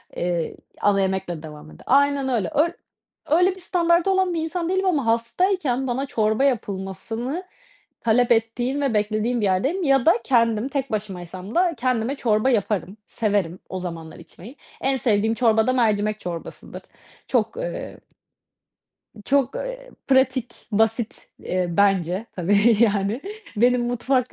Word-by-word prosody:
eee, 175 Hz, -2 st, -2 dB, 0.2 s
ana 200 Hz, -1 st, +3 dB
yemekle 190 Hz, -4 st, -2 dB
devam 150 Hz, -1 st, -10 dB
ederle -, -, -15 dB
aynen, 280 Hz, 0 st, +3 dB
öyle 235 Hz, -6 st, 0 dB
öy 305 Hz, +4 st, +4 dB, 0.6 s
öyle 360 Hz, +4 st, +4 dB
bir -, -, -13 dB
standardı 345 Hz, 0 st, +2 dB
olan 380 Hz, -2 st, +2 dB
bir 330 Hz, -, -1 dB
insan 335 Hz, +1 st, -2 dB
değilim 380 Hz, +1 st, +1 dB
ama 310 Hz, -9 st, +1 dB
hastayken 260 Hz, -, 0 dB
bana 260 Hz, +3 st, -1 dB
çorba 220 Hz, -2 st, +1 dB
yapılmasını 225 Hz, -, -2 dB, 0.6 s
talep 235 Hz, +2 st, +2 dB
ettiğim 240 Hz, +4 st, +1 dB
ve 275 Hz, -4 st, 0 dB
beklediğim 215 Hz, +3 st, 0 dB
bir -, -, +1 dB
yerdeyim 265 Hz, -, +1 dB
ya 275 Hz, -4 st, +3 dB
da 330 Hz, -, +7 dB
kendim 230 Hz, -2 st, +2 dB
tek 275 Hz, -3 st, -3 dB
başımaysam 190 Hz, -2 st, -5 dB
da 350 Hz, -1 st, +3 dB
kendime 250 Hz, +1 st, 0 dB
çorba 225 Hz, -2 st, +1 dB
yaparım, 210 Hz, -4 st, -1 dB
severim 200 Hz, -6 st, -1 dB
o 185 Hz, -, -4 dB
zamanlar 165 Hz, -3 st, -7 dB
içmeyi. 230 Hz, +10 st, -13 dB, 0.3 s
En 270 Hz, 0 st, +1 dB
sevdiğim 220 Hz, -2 st, +1 dB
çorba 225 Hz, -2 st, +3 dB
da 255 Hz, -, +3 dB
mercimek 215 Hz, -3 st, +1 dB
çorbasıdır. 175 Hz, -3 st, -7 dB, 0.5 s
Çok, -, -, 0 dB
ııı, -, -, -5 dB, 1.3 s
çok, 275 Hz, 0 st, +1 dB
eee, -, -, -6 dB, 0.2 s
pratik, 260 Hz, -2 st, +2 dB, 0.2 s
basit, 225 Hz, +2 st, 0 dB
eee, 185 Hz, 0 st, -1 dB
bence 190 Hz, +1 st, +1 dB
tabii, 205 Hz, +5 st, +3 dB
yani, 210 Hz, +1 st, +2 dB, 0.4 s
benim 245 Hz, +2 st, +3 dB
mutfak, 250 Hz, +1 st, 0 dB
235 Hz, 140 wpm, -23 LUFS, 205-275 Hz, 1.3 s, da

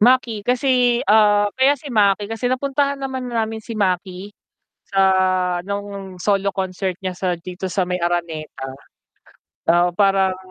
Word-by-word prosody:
Maki 240 Hz, -1 st, +3 dB
kasi, 250 Hz, -1 st, +2 dB
ah, 205 Hz, 0 st, +4 dB
kaya 270 Hz, +2 st, +3 dB
si 275 Hz, -1 st, -9 dB
Maki 205 Hz, -1 st, +3 dB
kasi 225 Hz, +2 st, -2 dB
napuntahan 280 Hz, +2 st, 0 dB
naman 260 Hz, -2 st, -4 dB
na 230 Hz, -2 st, 0 dB
namin 220 Hz, 0 st, -6 dB
si 225 Hz, 0 st, -8 dB
Maki 190 Hz, 0 st, -2 dB, 0.5 s
sa 195 Hz, -1 st, +1 dB, 0.6 s
nung 200 Hz, -2 st, -6 dB
solo 200 Hz, -1 st, +1 dB
concert 190 Hz, 0 st, -2 dB
niya 185 Hz, -1 st, -4 dB
sa 185 Hz, -2 st, 0 dB
dito 180 Hz, +2 st, -7 dB
sa 185 Hz, -1 st, -1 dB
may 180 Hz, -, 0 dB
Araneta, 170 Hz, -5 st, -3 dB, 1.0 s
ah, 175 Hz, +1 st, +4 dB
parang 195 Hz, -2 st, +3 dB
200 Hz, 145 wpm, -20 LUFS, 185-240 Hz, 1.0 s, ah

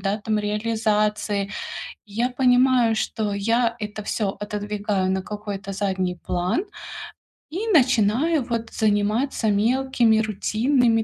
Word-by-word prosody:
да, 195 Hz, +2 st, -1 dB
там, 215 Hz, 0 st, -1 dB
реализации. 210 Hz, -1 st, 0 dB, 0.6 s
Я 230 Hz, +5 st, -1 dB
понимаю, 250 Hz, -2 st, +4 dB
что 215 Hz, -1 st, -1 dB
я 230 Hz, +3 st, +1 dB
это 210 Hz, 0 st, -5 dB
всё 200 Hz, -1 st, -2 dB
отодвигаю 205 Hz, -2 st, -2 dB
на 190 Hz, 0 st, 0 dB
какой-то 205 Hz, -1 st, -6 dB
задний 190 Hz, -2 st, -1 dB
план 180 Hz, -, 0 dB, 0.9 s
и 375 Hz, +9 st, -3 dB
начинаю, 265 Hz, -, +3 dB
вот, 230 Hz, -1 st, -2 dB
заниматься 220 Hz, +3 st, +1 dB
мелкими 230 Hz, +1 st, +3 dB
рутинными 225 Hz, +3 st, +2 dB
215 Hz, 110 wpm, -23 LUFS, 205-240 Hz, 0.9 s, понимаю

